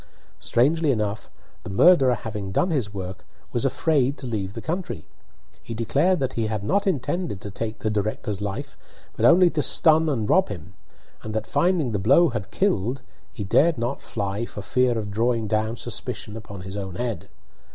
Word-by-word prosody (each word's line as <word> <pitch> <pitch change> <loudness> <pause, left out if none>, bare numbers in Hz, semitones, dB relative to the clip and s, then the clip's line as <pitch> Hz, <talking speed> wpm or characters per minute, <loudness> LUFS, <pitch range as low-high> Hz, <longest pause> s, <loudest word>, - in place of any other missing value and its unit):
Strangely 150 +6 +2
enough, 110 -4 -1 0.3
the - - -8
murderer 135 - +5
having 105 -3 -5
done 175 - +1
his 125 -10 -1
work, 95 -2 -6 0.3
was 120 +2 -1
afraid 140 -1 +1
to - - -7
leave 105 -5 -3
the - - -4
country. 175 +7 -4 0.6
He 115 - -7
declared 145 +11 +2
that 130 -1 -1
he 115 -2 -1
had 105 -2 -3
not 200 - +1
intended 175 - -1
to 100 - -7
take 110 +2 -4
the 110 - -2
director's 105 -1 -2
life, 100 -1 -4 0.4
but - - +1
only 175 +1 +6
to 150 - 0
stun 160 +1 +5
and 115 -7 -1
rob 190 - +3
him 90 -3 -8 0.5
and 110 0 -6
that, 110 0 -1
finding 170 -8 +1
the 105 - -1
blow 165 - +5
had 110 -6 -4
killed, 130 - 0 0.3
he 105 - -6
dared 155 - +3
not 120 +4 -2
fly 100 0 -3
for 105 - -8
fear 125 +1 +2
of 105 -2 -4
drawing 115 +1 +1
down 110 +2 -1
suspicion 105 - -4
upon 100 -4 -8
his 95 +2 -7
own 95 -3 -5
head. 115 -7 -4
115 Hz, 185 wpm, -24 LUFS, 105-145 Hz, 0.6 s, only